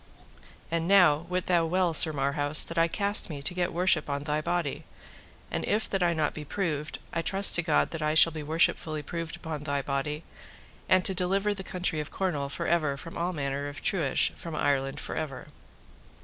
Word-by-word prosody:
And 165 0 -1
now 175 -5 +5
wit 180 0 -1
thou 175 -2 +3
well, 180 0 +1
Sir 160 - +5
Marhaus, 145 +1 +2
that 165 - -7
I 165 - +4
cast 200 +4 +1
me 145 -3 -6
to 160 - -1
get 180 0 -1
worship 175 -3 +2
on 140 0 -2
thy 150 0 -1
body; 165 -3 -2 0.7
and - - -2
if 215 +1 0
that 195 - 0
I 175 - +3
be 165 - -3 0.2
not 150 - -11
proved, 160 -6 -2 0.2
I 165 - 0
trust 195 +3 +4
to 175 - +5
God 160 -3 +1
that 165 - -5
I 155 0 0
shall 165 +1 +7
be 155 -1 -6
worshipfully 155 0 +1
proved 165 +2 -5
upon 160 -3 -6
thy 140 -2 -2
body, 145 +3 -3 0.7
and 185 0 +4
to 190 - +2
deliver 195 +3 0
the 195 -1 -7
country 180 -4 -2
of 150 - -4
Cornwall 150 -8 -2
for 170 +4 -4
ever 155 -5 +1
from 165 +4 -9
all 175 +2 -1
manner 140 -3 -3
of 145 0 -8
truage 160 -9 +1
from 165 -2 -7
Ireland 135 -2 0
for - - -5
ever. 145 -4 -5
165 Hz, 205 wpm, -28 LUFS, 145-180 Hz, 0.7 s, shall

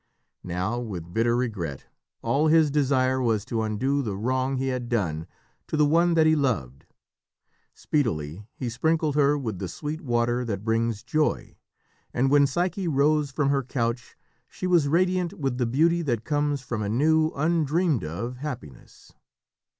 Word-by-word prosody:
Now, 90 +7 -2
with 90 -8 -6
bitter 115 +2 +2
regret, 100 - -3 0.4
all 140 +7 +2
his 155 -2 +4
desire 130 -2 +2
was 110 -4 0
to 115 -2 -2
undo 130 +6 0
the 105 -7 -3
wrong 130 +4 0
he 135 +1 -1
had 125 -2 -3
done 85 -10 -1 0.4
to 155 - -2
the 150 - +5
one 170 +3 +3
that 160 -1 +4
he 155 0 +5
loved. 90 - -2 0.9
Speedily 100 - -2
he 130 - -4
sprinkled 155 +6 0
her 145 0 +3
with 110 -9 -4
the 95 - -3
sweet 150 - -5
water 120 -1 0
that 105 -4 -4
brings 115 -1 0
joy, 150 +5 -1 0.6
and 135 +2 +2
when 145 -1 +5
Psyche 180 +6 -1
rose 150 0 +2
from 140 0 0
her 140 -1 +2
couch 120 -1 -3 0.3
she - - -6
was 175 -5 +3
radiant 180 +2 +1
with 135 -4 -2
the 120 - +1
beauty 165 +8 +2
that 120 -8 -2
comes 145 -2 0
from 120 -4 -3
a 100 - -2
new, 155 +7 +3
undreamed 160 - +1
of 100 +11 -5
happiness. 125 - -9
130 Hz, 160 wpm, -25 LUFS, 115-150 Hz, 0.9 s, the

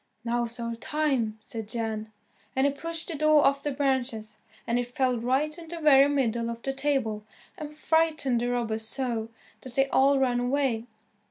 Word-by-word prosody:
"Now's 235 0 -1
our 235 0 -3
time," 245 -3 -1
said 220 -1 -5
Jan, 220 -2 -3 0.4
and 265 +1 +3
he 285 - +2
pushed 330 +3 -4
the 335 - -4
door 305 -1 +4
off 275 0 +3
the 295 - -2
branches, 255 -6 -1 0.3
and 235 +1 +1
it 245 - -2
fell 250 -1 0
right 265 +6 0
in 335 -1 -11
the 340 +1 -6
very 285 -3 +6
middle 235 -5 0
of 235 0 -6
the 270 - -2
table, 270 -7 -1 0.3
and 300 0 -8
frightened 310 -7 +1
the 245 - 0
robbers 225 -2 -1
so 235 -4 -2 0.3
that 255 -2 -10
they 270 0 +3
all 275 +1 +4
ran 250 -2 +2
away. 245 -2 0
260 Hz, 180 wpm, -27 LUFS, 230-285 Hz, 0.4 s, very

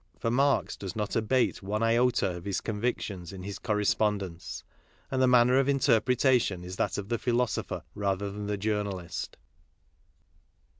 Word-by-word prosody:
For 115 - -1
Marx 140 +3 +2
does 95 -3 -6
not 105 -1 -2
abate 120 +3 +1
one 105 +3 -2
iota 115 -5 +2
of 85 - -10
his 100 -2 -1
con 105 -2 -4
victions 110 -7 -2
in 95 -2 -8
his 100 +1 -6
correspondence; 105 -4 -1 0.5
and 130 -1 +1
the 130 - +5
manner 125 +1 +5
of 135 0 +2
inter 135 -5 +4
pretation 125 -6 +2
is 90 +1 -6
that - - 0
of 100 0 -5
the 120 -1 0
philosopher 120 -1 -1
rather 100 0 -1
than 105 +1 -5
the 105 0 -1
journalist. 100 -4 -3
105 Hz, 160 wpm, -29 LUFS, 100-120 Hz, 0.5 s, the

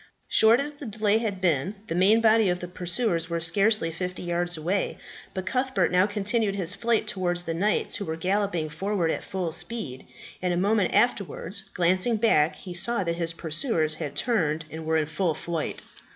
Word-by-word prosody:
Short 225 +2 +5
as 290 +2 -2
the 285 -2 -9
delay 215 0 +1
had 210 -5 -3
been, 170 +1 +1
the 190 - -4
main 195 +6 +4
body 220 -2 +4
of 180 0 0
the 180 - -6
pursuers 175 0 -1
were 170 0 -1
scarcely 195 +2 +2
fifty 180 +3 -5
yards 175 0 -1
away; 180 +5 -1 0.4
but 190 -1 -3
Cuthbert 260 +3 0
now 180 +2 +4
continued 210 0 0
his 185 -2 0
flight 230 0 0
towards 180 -4 -1
the 165 - -3
knights, 200 +6 0
who 200 - -4
were 160 - -3
galloping 185 -1 0
forward 185 +1 -1
at - - -3
full 185 -3 -3
speed; 170 - -5 0.3
and 180 -1 0
a - - -1
moment 200 +1 +2
afterwards 205 -3 0
glancing 185 +6 +2
back, 175 -8 +3
he 180 - -9
saw 195 +4 +1
that 170 -1 -2
his 170 -1 0
pursuers 160 - 0
had 150 -2 -5
turned 165 -10 0
and 160 0 -7
were 160 0 +2
in 155 - +1
full 160 +1 -1
flight. 165 -1 -4
185 Hz, 190 wpm, -26 LUFS, 165-210 Hz, 0.4 s, Short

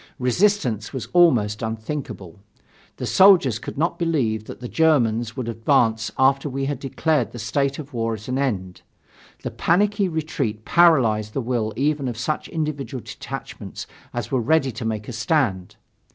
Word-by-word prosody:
Resistance 125 - +1
was 130 - -4
almost 120 -13 +4
unthinkable. 110 - -5 0.6
The - - -4
soldiers 175 - +5
could - - -8
not 165 +4 0
believe 125 -11 0
that - - -9
the 125 - -6
Germans 120 -7 +2
would 125 -3 -3
advance 115 -1 +1
after 135 +2 +3
we 135 +1 -2
had 140 -2 -2
declared 140 -1 0
the - - -7
state 135 +5 -1
of 145 -2 -9
war 115 -1 -1
at 110 0 -11
an 130 +1 -1
end. 95 -10 -2 0.6
The - - -3
panicky 205 +3 +2
retreat 140 -9 -3
paralyzed 115 -12 +4
the - - -1
will 115 -3 -1
even 140 +1 0
of 120 -3 -4
such 150 +6 -2
individual 145 -6 -3
detachments - - -7 0.3
as 120 -2 -4
were 130 -2 +1
ready 140 +1 +2
to 120 0 -6
make 110 -1 -3
a 125 - -6
stand. 115 - 0
130 Hz, 160 wpm, -23 LUFS, 110-150 Hz, 0.6 s, soldiers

